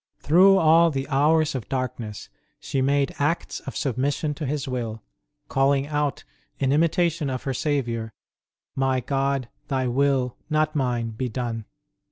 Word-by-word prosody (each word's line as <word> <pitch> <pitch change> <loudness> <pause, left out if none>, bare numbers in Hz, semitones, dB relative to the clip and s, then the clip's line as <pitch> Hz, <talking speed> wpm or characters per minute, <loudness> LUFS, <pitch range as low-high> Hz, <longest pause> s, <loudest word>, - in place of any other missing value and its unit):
Through 190 +6 +5
all 165 0 +5
the 135 -3 -3
hours 155 +2 +3
of 130 -6 -5
darkness 120 -5 -4 0.3
she 135 - -2
made 140 +1 +1
acts 150 +4 -1
of - - -7
submission 140 +3 -1
to 145 -1 -5
His 145 +1 -2
will, 115 -4 -4 0.4
calling 135 0 +2
out, 145 -1 -1 0.3
in 135 -1 +1
imitation 165 0 +2
of 130 -1 -4
her 135 - -2
Saviour, 120 -6 -1 0.6
My 135 -1 +1
God, 135 0 -1 0.2
Thy 130 -1 0
will, 130 -1 +1
not 155 0 +1
mine, 120 -5 0
be 125 +3 -3
done 115 -2 -4
135 Hz, 145 wpm, -24 LUFS, 125-150 Hz, 0.6 s, Through